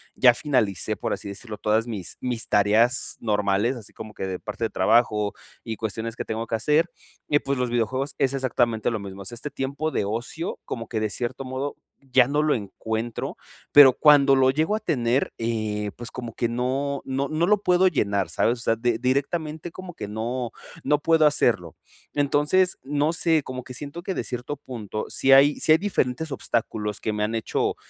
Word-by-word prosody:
ya 125 Hz, -2 st, +6 dB
finalicé, 120 Hz, -, 0 dB
por -, -, -2 dB
así 100 Hz, -, -6 dB
decirlo, 105 Hz, +2 st, -7 dB
todas 110 Hz, +3 st, +1 dB
mis 100 Hz, -7 st, -4 dB
mis 125 Hz, -2 st, -3 dB
tareas 110 Hz, +5 st, +3 dB
normales, 105 Hz, +3 st, +1 dB
así 110 Hz, -3 st, -9 dB
como 110 Hz, -1 st, -9 dB
que 95 Hz, -, -4 dB
de 95 Hz, -1 st, -4 dB
parte 110 Hz, +2 st, -4 dB
de -, -, -2 dB
trabajo 105 Hz, -2 st, +2 dB, 0.3 s
y 110 Hz, -2 st, -5 dB
cuestiones 110 Hz, +1 st, -4 dB
que -, -, -4 dB
tengo 110 Hz, +1 st, -3 dB
que -, -, -1 dB
hacer, 150 Hz, +9 st, +2 dB, 0.4 s
y 145 Hz, -, +4 dB
pues 140 Hz, -1 st, -2 dB
los 125 Hz, -1 st, 0 dB
videojuegos 130 Hz, +4 st, -1 dB
es 135 Hz, -1 st, +1 dB
exactamente 120 Hz, -4 st, 0 dB
lo 115 Hz, -, -2 dB
mismo. 100 Hz, -1 st, -8 dB
O -, -, -9 dB
sea, 120 Hz, -, -5 dB
este 135 Hz, +5 st, -4 dB
tiempo 140 Hz, +3 st, -3 dB
de -, -, 0 dB
ocio, 120 Hz, -, -4 dB
como 115 Hz, -1 st, -5 dB
que 110 Hz, -, -2 dB
de 110 Hz, -1 st, -1 dB
cierto 125 Hz, +5 st, -4 dB
modo 130 Hz, +2 st, -4 dB, 0.3 s
ya 125 Hz, 0 st, +5 dB
no 145 Hz, +1 st, +2 dB
lo 155 Hz, -, +3 dB
encuentro, 110 Hz, +2 st, -4 dB, 0.4 s
pero 145 Hz, -2 st, +10 dB
cuando 145 Hz, -2 st, +6 dB
lo 130 Hz, 0 st, +5 dB
llego 155 Hz, +9 st, +1 dB
a 215 Hz, -, -1 dB
tener, 125 Hz, -, 0 dB
eh, 110 Hz, -2 st, -2 dB
pues 120 Hz, 0 st, -7 dB
como 120 Hz, -3 st, -7 dB
que 120 Hz, -, -1 dB
no 130 Hz, +4 st, -1 dB
no 135 Hz, +1 st, -1 dB
no 155 Hz, +2 st, +1 dB
lo 210 Hz, 0 st, +3 dB
puedo 180 Hz, -1 st, +4 dB
llenar, 100 Hz, -, 0 dB
¿sabes? 120 Hz, +1 st, +1 dB
O -, -, -9 dB
sea, 115 Hz, -, +1 dB
de 115 Hz, 0 st, +1 dB
directamente 155 Hz, +5 st, -1 dB
como 185 Hz, 0 st, -9 dB
que 105 Hz, -, -6 dB
no 120 Hz, +3 st, -3 dB, 0.3 s
no 150 Hz, +1 st, +2 dB
puedo 160 Hz, +1 st, +4 dB
hacerlo. 115 Hz, -, +2 dB, 0.4 s
Entonces, 150 Hz, +6 st, +2 dB
no 145 Hz, +3 st, 0 dB
sé, 160 Hz, -3 st, +2 dB
como 130 Hz, -1 st, -6 dB
que 125 Hz, -, -10 dB
siento 145 Hz, +6 st, -6 dB
que 190 Hz, -, -2 dB
de -, -, -2 dB
cierto 125 Hz, +3 st, -4 dB
punto, 110 Hz, -6 st, -6 dB
si 135 Hz, -, +2 dB
hay 140 Hz, +2 st, +6 dB
si 155 Hz, -, +5 dB
hay -, -, +6 dB
diferentes 160 Hz, -6 st, -1 dB
obstáculos 110 Hz, -5 st, -2 dB
que 110 Hz, -, -1 dB
me 105 Hz, 0 st, -1 dB
han 110 Hz, +2 st, -1 dB
hecho 110 Hz, -, -1 dB
125 Hz, 200 wpm, -24 LUFS, 110-145 Hz, 0.4 s, pero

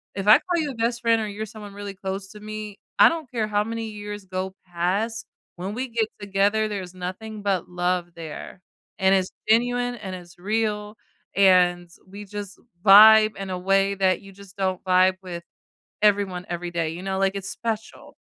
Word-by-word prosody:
If 195 Hz, +1 st, -4 dB
I 215 Hz, -, +9 dB
call 350 Hz, -2 st, -1 dB
you 290 Hz, -2 st, -2 dB
a -, -, -9 dB
best 235 Hz, +1 st, -1 dB
friend, 230 Hz, -1 st, +3 dB
or 215 Hz, -, -2 dB
you're 210 Hz, +2 st, -5 dB
someone 210 Hz, -2 st, -10 dB
really 200 Hz, -1 st, -7 dB
close 195 Hz, +1 st, -5 dB
to 210 Hz, -, -12 dB
me, 215 Hz, -1 st, -7 dB, 0.2 s
I -, -, +9 dB
don't 320 Hz, -6 st, -5 dB
care 220 Hz, -3 st, -1 dB
how 210 Hz, 0 st, +1 dB
many 230 Hz, 0 st, -4 dB
years 205 Hz, -1 st, -7 dB
go 190 Hz, 0 st, -4 dB
past. 190 Hz, +6 st, -1 dB, 0.3 s
When 190 Hz, +3 st, -4 dB
we 260 Hz, +3 st, -3 dB
get 225 Hz, -1 st, 0 dB
together, 205 Hz, +2 st, +1 dB
there's 185 Hz, -3 st, -5 dB
nothing 205 Hz, +4 st, -6 dB
but 195 Hz, -4 st, 0 dB
love 175 Hz, 0 st, -1 dB
there, 165 Hz, +3 st, -8 dB, 0.4 s
and 190 Hz, -1 st, +3 dB
it's 185 Hz, 0 st, +1 dB, 0.2 s
genuine 245 Hz, +2 st, +2 dB
and 190 Hz, -4 st, -6 dB
it's 175 Hz, -1 st, -12 dB
real, 210 Hz, +1 st, -1 dB, 0.4 s
and 180 Hz, -3 st, +4 dB, 0.2 s
we 205 Hz, +1 st, -9 dB
just 205 Hz, 0 st, -7 dB, 0.3 s
vibe 215 Hz, +2 st, +9 dB
in 195 Hz, -1 st, -5 dB
a 180 Hz, -, -2 dB
way 195 Hz, +1 st, +2 dB
that 190 Hz, -1 st, +2 dB
you 195 Hz, 0 st, -13 dB
just 200 Hz, 0 st, -16 dB
don't 185 Hz, -2 st, -1 dB
vibe 185 Hz, 0 st, +4 dB
with 175 Hz, -2 st, -7 dB, 0.6 s
everyone 200 Hz, -3 st, +2 dB
every 175 Hz, 0 st, -4 dB
day. 165 Hz, -2 st, -1 dB
You 170 Hz, +3 st, -7 dB
know, 190 Hz, 0 st, -2 dB
like, 195 Hz, 0 st, +1 dB
it's 195 Hz, 0 st, -5 dB
special. 225 Hz, -1 st, -5 dB
200 Hz, 190 wpm, -24 LUFS, 185-215 Hz, 0.6 s, I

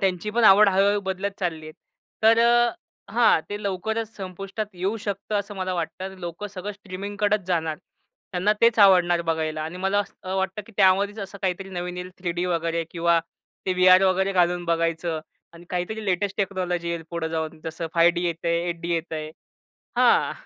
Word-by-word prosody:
त्यांची 190 Hz, +1 st, 0 dB
पण 230 Hz, +2 st, +1 dB
आवड 205 Hz, +1 st, +8 dB
हळू-हळू 200 Hz, +2 st, +3 dB
बदलत 190 Hz, +1 st, -2 dB
चालली 160 Hz, -4 st, -3 dB
आहे. 155 Hz, -, -9 dB, 0.5 s
तर 225 Hz, +1 st, +6 dB
अ 240 Hz, +1 st, +5 dB, 0.4 s
हां, 235 Hz, -7 st, +4 dB
ते 205 Hz, 0 st, -4 dB
लवकरच 220 Hz, +3 st, -3 dB
संपुष्टात 195 Hz, +2 st, -5 dB
येऊ 190 Hz, +5 st, -2 dB
शकतं 205 Hz, -1 st, -4 dB
असं 205 Hz, +1 st, -5 dB
मला 185 Hz, -1 st, -2 dB
वाटतं. 185 Hz, +3 st, -4 dB
लोकं 175 Hz, +2 st, -6 dB
सगळं 205 Hz, 0 st, -6 dB
स्ट्रीमिंगकडंच 205 Hz, +1 st, -2 dB
जाणार. 160 Hz, -4 st, 0 dB, 0.6 s
त्यांना 185 Hz, +3 st, +2 dB
तेच 230 Hz, -1 st, +4 dB
आवडणार 180 Hz, -3 st, +5 dB
बघायला 160 Hz, -1 st, -1 dB
आणि 160 Hz, +3 st, -6 dB
मला 195 Hz, +2 st, 0 dB
असं 190 Hz, -2 st, -4 dB
वाटतं 190 Hz, +2 st, -2 dB
की 230 Hz, -, -15 dB
त्यामध्येच 200 Hz, +3 st, +3 dB
असं 200 Hz, 0 st, -7 dB
काहीतरी 190 Hz, +1 st, -2 dB
नवीन 180 Hz, -1 st, -4 dB
येईल 180 Hz, 0 st, -6 dB
3D 175 Hz, -1 st, -2 dB
वगैरे 165 Hz, -1 st, -1 dB
किंवा 170 Hz, 0 st, +2 dB, 0.5 s
ते 185 Hz, -, +2 dB
व्हीआर 185 Hz, +1 st, +6 dB
वगैरे 190 Hz, +1 st, +2 dB
घालून 175 Hz, -1 st, +2 dB
बघायचं 165 Hz, -1 st, -1 dB, 0.3 s
आणि 170 Hz, +1 st, -14 dB
काहीतरी 185 Hz, +5 st, -3 dB
लेटेस्ट 195 Hz, 0 st, -1 dB
टेक्नॉलॉजी 180 Hz, -3 st, -1 dB
येईल 170 Hz, -1 st, -3 dB
पुढं 170 Hz, -1 st, -2 dB
जाऊन, 160 Hz, -1 st, -4 dB
जसं 165 Hz, +1 st, -4 dB
5D 170 Hz, +1 st, +4 dB
येतंय 170 Hz, 0 st, -1 dB
8D 170 Hz, 0 st, -3 dB
येतंय, 160 Hz, -2 st, -4 dB, 0.7 s
हां. -, -, +4 dB
185 Hz, 165 wpm, -24 LUFS, 170-200 Hz, 0.7 s, आवड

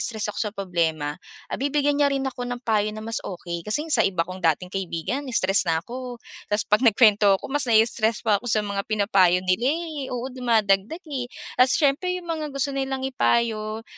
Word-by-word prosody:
stress 215 Hz, -2 st, -1 dB
ako -, -, -8 dB
sa -, -, -8 dB
problema, 165 Hz, -5 st, -2 dB, 0.3 s
ah, -, -, -2 dB
bibigyan 285 Hz, +1 st, +1 dB
niya 285 Hz, -, +5 dB
rin 275 Hz, -1 st, -1 dB
ako 250 Hz, -2 st, -4 dB
ng 245 Hz, 0 st, -4 dB
payo 215 Hz, -2 st, +1 dB
na 215 Hz, -, -7 dB
mas 225 Hz, 0 st, 0 dB
okey 175 Hz, -2 st, -6 dB
kasi 295 Hz, +8 st, 0 dB
sa 240 Hz, -, +4 dB
iba 180 Hz, -6 st, +1 dB
kong 185 Hz, +2 st, -8 dB
dating 175 Hz, +2 st, 0 dB
kaibigan 195 Hz, -, -3 dB
stress 190 Hz, -1 st, +2 dB
na 160 Hz, 0 st, 0 dB
ako, 250 Hz, 0 st, -7 dB, 0.3 s
tapos 210 Hz, 0 st, +1 dB
pag 210 Hz, -, +5 dB
nagkuwento 210 Hz, -4 st, +5 dB
ako -, -, -17 dB
mas 290 Hz, -3 st, +2 dB
nai-stress 225 Hz, 0 st, +2 dB
pa 210 Hz, -3 st, +2 dB
ako 245 Hz, -, -6 dB
sa 215 Hz, -2 st, +2 dB
mga 200 Hz, -1 st, -2 dB
pinapayo 195 Hz, -4 st, +3 dB
nila 185 Hz, +7 st, +1 dB
eh, 315 Hz, -5 st, -5 dB
oo 245 Hz, -1 st, -4 dB
dumadagdag 230 Hz, -, +1 dB
eh, 265 Hz, -6 st, -4 dB, 0.3 s
at 255 Hz, -, +7 dB
siyempre 285 Hz, +6 st, +2 dB
'yung 360 Hz, -, -8 dB
mga 310 Hz, -2 st, -3 dB
gusto 275 Hz, 0 st, -2 dB
nilang 270 Hz, -1 st, -2 dB
ipayo, 225 Hz, -4 st, 0 dB
225 Hz, 200 wpm, -24 LUFS, 195-265 Hz, 0.3 s, at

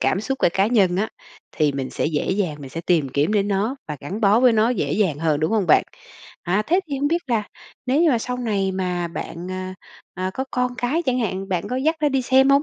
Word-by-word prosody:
cảm 190 Hz, -, +1 dB
xúc 270 Hz, +4 st, -3 dB
của -, -, +4 dB
cá 195 Hz, +1 st, +2 dB
nhân 195 Hz, -6 st, +3 dB
á, 215 Hz, +3 st, 0 dB, 0.5 s
thì 150 Hz, -3 st, +2 dB
mình 135 Hz, -1 st, -4 dB
sẽ -, -, -1 dB
dễ 150 Hz, +1 st, -1 dB
dàng, 185 Hz, -6 st, -1 dB
mình 135 Hz, -2 st, -9 dB
sẽ 165 Hz, -, -5 dB
tìm 165 Hz, -6 st, +1 dB
kiếm 145 Hz, +9 st, 0 dB
đến 205 Hz, -1 st, +1 dB
nó 205 Hz, +7 st, 0 dB
và 150 Hz, -, -4 dB
gắn 190 Hz, +10 st, -5 dB
bó 210 Hz, +2 st, +4 dB
với 250 Hz, -1 st, +6 dB
nó 220 Hz, +1 st, +3 dB
dễ 165 Hz, -, -1 dB
dàng 185 Hz, -8 st, +1 dB
hơn, 155 Hz, -2 st, +1 dB
đúng 155 Hz, -, +1 dB
hông 210 Hz, -5 st, +1 dB
bạn? -, -, +6 dB, 0.6 s
À, 190 Hz, +5 st, +1 dB
thế 360 Hz, +4 st, +3 dB
thì 280 Hz, -, -1 dB
hông 290 Hz, +1 st, +1 dB
biết 340 Hz, +2 st, 0 dB
là 230 Hz, -4 st, +1 dB, 0.4 s
nếu 270 Hz, +4 st, +2 dB
như 330 Hz, -, +5 dB
mà 240 Hz, -, +2 dB
sau 250 Hz, +2 st, -3 dB
này 200 Hz, -6 st, -1 dB
mà 180 Hz, -2 st, -2 dB
bạn, 170 Hz, +2 st, -6 dB
à, 185 Hz, 0 st, -5 dB, 0.4 s
à, 185 Hz, +1 st, -2 dB
có 265 Hz, -, -2 dB
con 250 Hz, 0 st, -1 dB
cái 260 Hz, +7 st, -1 dB
chẳng 255 Hz, -5 st, 0 dB
hạn, 195 Hz, -2 st, -2 dB
bạn 180 Hz, -3 st, -2 dB
có 250 Hz, -, -2 dB
dắt 315 Hz, +5 st, +1 dB
nó 295 Hz, -, +3 dB
đi 265 Hz, -2 st, 0 dB
xem 265 Hz, +2 st, +4 dB
hông? 280 Hz, +1 st, +5 dB
205 Hz, 260 wpm, -22 LUFS, 175-250 Hz, 0.6 s, với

